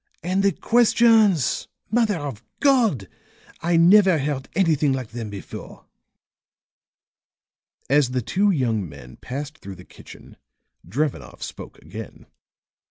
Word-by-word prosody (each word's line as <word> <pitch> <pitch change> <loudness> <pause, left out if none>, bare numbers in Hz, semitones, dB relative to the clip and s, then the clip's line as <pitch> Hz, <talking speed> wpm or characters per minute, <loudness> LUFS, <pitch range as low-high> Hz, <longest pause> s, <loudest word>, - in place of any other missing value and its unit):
And 185 +3 0
the 200 0 +3
questions! 225 - +3 0.2
Mother 220 -4 +2
of 140 -7 -6 0.2
God! 230 - +2 0.5
I 170 0 +1
never 185 +1 +6
heard 140 -2 -3
anything 155 -6 +2
like 130 -4 -4
them 115 -1 -6
before." 100 -1 -10 2.0
As 140 -2 +3
the 125 -1 -2
two 200 - +1
young 115 - 0
men 65 -3 -13
passed 145 +4 -7
through 95 0 -9
the 90 0 -14
kitchen - - -15 0.5
Drevenoff 115 - -3
spoke - - -9
again. 100 +8 -10
145 Hz, 115 wpm, -23 LUFS, -, 2.0 s, never